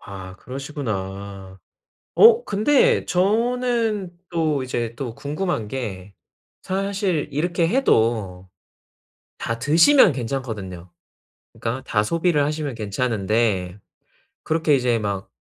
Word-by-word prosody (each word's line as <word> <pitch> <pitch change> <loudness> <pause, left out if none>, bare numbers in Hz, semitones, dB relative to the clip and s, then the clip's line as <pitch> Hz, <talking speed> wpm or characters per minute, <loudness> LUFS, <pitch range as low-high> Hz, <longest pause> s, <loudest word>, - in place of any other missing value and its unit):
아 95 -2 -9
그러시구나. 100 -8 -6 0.6
어 460 +2 +7
근데 220 +8 +3
저는 225 0 0 0.2
또 155 -5 0
이제 120 -2 -3
또 125 -4 -5
궁금한 145 - -3
게 100 -6 -6 0.5
사실 190 -5 -1
이렇게 170 +3 0
해도 110 - +1 0.9
다 115 0 -3
드시면 165 - +5
괜찮거든요. 110 -9 -5 0.6
그니까 125 +3 -4
다 105 - +1
소비를 165 +4 +1
하시면 150 -2 -3
괜찮은데 105 -3 -1 0.6
그렇게 160 -1 +1
이제 125 -2 +1
막 100 -1 -3
130 Hz, 215 characters per minute, -22 LUFS, 105-175 Hz, 0.9 s, 어